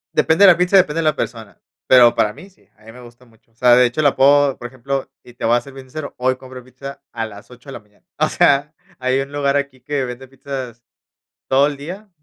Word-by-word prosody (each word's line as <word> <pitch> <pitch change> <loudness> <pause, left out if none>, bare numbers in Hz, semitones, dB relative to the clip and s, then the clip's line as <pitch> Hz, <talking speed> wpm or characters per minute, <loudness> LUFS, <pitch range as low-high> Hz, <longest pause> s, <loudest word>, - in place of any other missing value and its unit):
Depende 180 +5 +4
de 185 - +9
la 170 - +2
pizza, 180 +2 +3
depende 165 -3 +2
de - - 0
la 155 -1 +2
persona, 110 -4 -6 0.3
pero 120 -2 +6
para 105 -3 0
mí 160 - -14
sí, - - -31
a 110 - -25
mí 115 - -12
me 125 +1 -14
gusta 120 +1 -16
mucho. 115 -1 -28
O - - -37
sea, 125 0 +5
de 125 0 +5
hecho, 135 +6 -3
la 145 - +3
puedo, 140 0 +3
por 120 - -6
ejemplo, 135 +2 -5
y 125 - -16
te 120 - -11
voy 115 +1 +3
a - - -2
ser 135 +2 -14
bien 135 -1 -12
sincero, 155 +2 -7
hoy 130 +1 +1
compro 130 -1 -12
pizza 135 +2 -11
a 115 -1 -4
las 105 0 -12
8 125 +3 -15
de 135 - -8
la - - -8
mañana. 105 -1 -31
O - - +2
sea, 145 +3 +2 0.2
hay 130 +1 0
un 135 +1 -7
lugar 145 -1 0
aquí 140 -3 -5
que 135 0 -2
vende 125 +2 -8
pizzas 130 -3 -8 0.7
todo 135 +2 +4
el 145 -1 -3
día, 185 +9 -9
130 Hz, 260 wpm, -19 LUFS, 120-145 Hz, 0.7 s, de